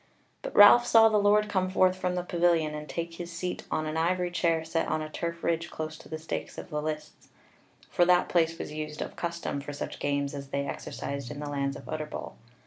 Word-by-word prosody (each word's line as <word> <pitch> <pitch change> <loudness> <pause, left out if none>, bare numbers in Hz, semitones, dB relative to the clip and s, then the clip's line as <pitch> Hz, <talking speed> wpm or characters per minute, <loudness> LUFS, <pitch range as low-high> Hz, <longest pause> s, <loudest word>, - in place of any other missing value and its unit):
But - - -6
Ralph 240 +4 +9
saw 225 -1 +7
the 215 -1 +3
Lord 210 +1 +4
come 185 -3 0
forth 185 0 +3
from 180 -1 -2
the 180 - -1
pavilion 170 -3 +2
and 150 0 -7
take 170 0 -4
his 170 +1 -7
seat 180 +1 -4
on 155 - -1
an 155 +1 -3
ivory 175 +2 +1
chair 165 -2 +1
set 165 0 -1
on - - 0
a 155 0 -6
turf 170 0 -4
ridge 170 0 0
close 155 0 -5
to - - -14
the 160 - -4
stakes 160 +1 -5
of - - -8
the 150 0 -1
lists: 155 0 -6 0.6
for 175 - +2
that 180 0 +4
place 165 -1 +2
was - - -6
used 150 0 -4
of - - -9
custom 170 -4 -3
for 145 +1 -7
such 145 - -6
games 140 0 -1
as 140 -1 -6
they 140 +1 -2
exercised 140 -1 -5
in 145 - -7
the 150 - -5
lands 140 -1 -1
of - - -10
Utterbol. 155 -1 -5
165 Hz, 225 wpm, -28 LUFS, 150-180 Hz, 0.6 s, Ralph